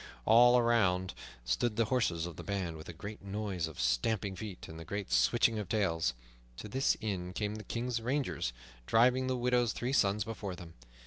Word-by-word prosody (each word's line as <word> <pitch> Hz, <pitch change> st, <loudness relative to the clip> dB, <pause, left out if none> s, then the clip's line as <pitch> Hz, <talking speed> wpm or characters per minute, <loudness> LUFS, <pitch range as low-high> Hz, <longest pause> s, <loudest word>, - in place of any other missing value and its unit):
All 120 Hz, +2 st, +7 dB
around 100 Hz, -7 st, +2 dB, 0.3 s
stood 85 Hz, -, 0 dB
the 115 Hz, -, +2 dB
horses 105 Hz, -9 st, 0 dB
of 85 Hz, -2 st, -7 dB
the -, -, -7 dB
band, 95 Hz, -5 st, -3 dB
with 80 Hz, +1 st, -10 dB
a -, -, -3 dB
great 105 Hz, +6 st, -8 dB
noise 100 Hz, -4 st, -3 dB
of 80 Hz, -, -10 dB
stamping 95 Hz, -, 0 dB
feet 100 Hz, -3 st, -7 dB
and 80 Hz, +1 st, -9 dB
a -, -, -6 dB
great 100 Hz, 0 st, -5 dB
switching 60 Hz, -, +3 dB
of 100 Hz, -4 st, -5 dB
tails. 80 Hz, -, +1 dB, 0.4 s
To 105 Hz, -, -7 dB
this 135 Hz, +6 st, +1 dB
inn 90 Hz, -4 st, -3 dB
came 105 Hz, +1 st, -2 dB
the 110 Hz, 0 st, -7 dB
King's 120 Hz, +1 st, -2 dB
rangers, 130 Hz, -, -1 dB, 0.4 s
driving 125 Hz, +3 st, +4 dB
the 130 Hz, -1 st, 0 dB
widow's 125 Hz, -1 st, +2 dB
three 125 Hz, +2 st, -2 dB
sons 100 Hz, -5 st, +3 dB
before 100 Hz, -3 st, -5 dB
them. 85 Hz, -2 st, -11 dB
105 Hz, 190 wpm, -32 LUFS, 90-115 Hz, 0.4 s, All